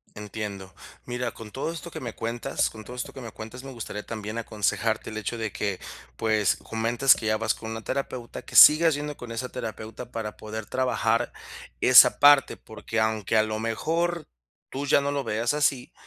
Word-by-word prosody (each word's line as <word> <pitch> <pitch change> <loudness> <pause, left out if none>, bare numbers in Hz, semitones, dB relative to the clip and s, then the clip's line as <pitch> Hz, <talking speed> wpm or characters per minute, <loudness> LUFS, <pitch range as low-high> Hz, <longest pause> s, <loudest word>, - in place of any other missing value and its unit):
Entiendo. 105 -2 -6 0.3
Mira, 125 -1 -3
con 110 -2 -10
todo 135 +7 -3
esto 170 +1 -7
que - - -7
me 120 -3 -6
cuenta 115 +1 -5 0.2
con 110 -1 -10
todo 125 +4 -9
esto 125 - -5
que 135 - -9
me 115 -2 -8
cuentas, 115 +5 -9
me 135 - -8
gustaría 110 -4 -6
también 110 0 -6
aconsejarte 110 0 -1
el 110 - -6
hecho 110 +2 -4
de 110 -2 -3
que, 100 -3 -3 0.4
pues, 110 -3 +2
comentas 115 +4 +2
que - - -7
ya 110 0 +2
vas 110 0 0
con 110 0 -7
una 110 0 -6
terapeuta, 130 -2 -4
que - - -11
sigas 160 +2 +9
yendo 145 0 -4
con 120 -1 -9
esa 115 +2 -4
terapeuta 110 0 -7
para 110 -2 -5
poder 110 0 -7
trabajar 120 -2 0 0.5
esa - - +8
parte, 145 -1 +6
porque 110 +1 -5
aunque 110 -1 +1
a 110 - +5
lo 110 0 -3
mejor 165 +9 -1 0.4
tú 140 +2 -4
ya 140 0 +4
no 140 0 -1
lo 140 -1 -1
veas 115 +4 -1
así, 140 -4 0
115 Hz, 195 wpm, -26 LUFS, 110-130 Hz, 0.5 s, sigas